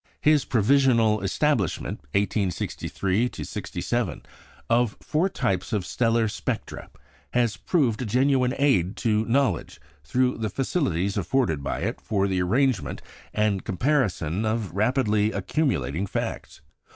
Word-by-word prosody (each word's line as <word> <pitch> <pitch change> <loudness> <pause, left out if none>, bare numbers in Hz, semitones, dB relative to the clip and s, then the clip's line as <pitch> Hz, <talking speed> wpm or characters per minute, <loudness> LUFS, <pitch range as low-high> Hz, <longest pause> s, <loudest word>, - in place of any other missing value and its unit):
His 150 -2 +4
provisional 115 -2 +3
establishment 100 - 0
(1863 100 +2 0
67) - - -3 0.4
of 120 -2 +2
four 165 +5 0
types 100 - -1
of 100 -4 0
stellar 115 +4 +1
spectra 105 - -4 0.4
has 120 -4 +2
proved 125 - 0
a - - -2
genuine 130 +2 +2
aid 120 -10 +2
to 110 -1 +1
knowledge 120 - 0 0.2
through 125 - +1
the 110 -1 -1
facilities 100 - -1
afforded 95 - 0
by - - -3
it - - -3
for 100 -2 0
the 95 -2 0
arrangement 105 - 0 0.3
and 105 -3 0
comparison 100 - 0
of 110 -3 -1
rapidly 110 0 +2
accumulating 95 - -1
facts. - - -4
110 Hz, 115 wpm, -25 LUFS, 95-130 Hz, 0.4 s, His